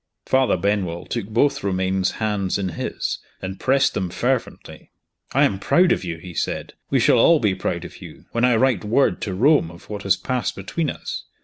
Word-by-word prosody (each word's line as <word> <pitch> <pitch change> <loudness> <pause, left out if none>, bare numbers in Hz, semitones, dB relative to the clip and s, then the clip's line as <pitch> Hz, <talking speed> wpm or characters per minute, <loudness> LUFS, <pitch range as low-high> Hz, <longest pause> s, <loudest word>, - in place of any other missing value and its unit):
Father 130 -7 +2
Benwell 90 -3 -1
took 100 - -4
both 140 +6 +1
Romayne's 95 -1 0
hands 105 -4 -1
in 95 -2 -2
his, 80 - -3 0.2
and 95 0 -6
pressed 135 +1 +2
them 95 -2 -2
fervently. 125 +7 -3 0.4
"I - - +3
am 95 - +1
proud 175 - +3
of - - +1
you!" 85 -2 -4
he 90 +2 -10
said. - - -3 0.2
"We - - +2
shall - - +4
all 165 +6 +6
be 105 -6 +2
proud 95 - -3
of - - -11
you, - - -12
when 115 - -1
I 125 -1 +4
write 125 -5 +2
word 115 +6 +2
to 95 -3 -3
Rome 135 - +4
of 85 +5 -14
what 105 -1 -4
has 100 -2 +3
passed 125 -3 -2
between 145 - -2
us. - - -6
100 Hz, 200 wpm, -22 LUFS, 95-130 Hz, 0.4 s, all